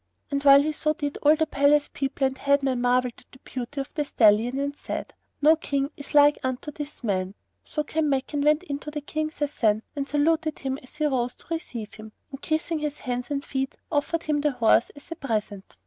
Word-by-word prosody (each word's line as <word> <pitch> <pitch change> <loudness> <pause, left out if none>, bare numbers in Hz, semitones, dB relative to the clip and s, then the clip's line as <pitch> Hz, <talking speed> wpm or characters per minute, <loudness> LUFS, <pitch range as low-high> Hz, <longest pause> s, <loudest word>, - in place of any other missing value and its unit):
And 280 0 -1
while 280 0 +8
he 310 - 0
so 305 0 0
did, 290 -2 -4
all 300 +1 +5
the 315 0 +1
palace 290 0 +3
people 275 0 -1
and 265 0 0
head 280 +1 +2
men 260 -2 0
marvelled 250 0 +2
at - - -22
the - - -15
beauty 255 +2 -5
of 270 - -9
the 300 - 0
stallion 230 -1 +3
and 285 +1 -2
said, - - -5 0.3
"No 310 +2 +7
King 280 -2 -2
is 285 +1 -8
like 290 0 +6
unto 260 +3 -3
this 295 -1 -8
man." 190 -2 -1 0.3
So 300 - -3
Kanmakan 290 -2 0
went 300 +3 +3
in 285 -6 -4
to 300 +1 -5
King 310 +2 -2
Sasan 240 -9 0
and 280 -1 -2
saluted 310 +1 +1
him 270 0 -3
as 255 - -14
he 305 0 0
rose 250 -4 0
to - - -19
receive 235 -9 -5
him; 215 0 -11 0.2
and, 270 0 -8
kissing 315 +1 -1
his 300 -1 -3
hands 245 -1 -4
and 280 -1 -2
feet, 270 -1 -2 0.2
offered 320 +2 0
him 300 -1 0
the 295 -1 +1
horse 230 -1 +3
as 285 +3 -14
a - - -3
present. 210 -8 -4
280 Hz, 215 wpm, -25 LUFS, 255-300 Hz, 0.3 s, while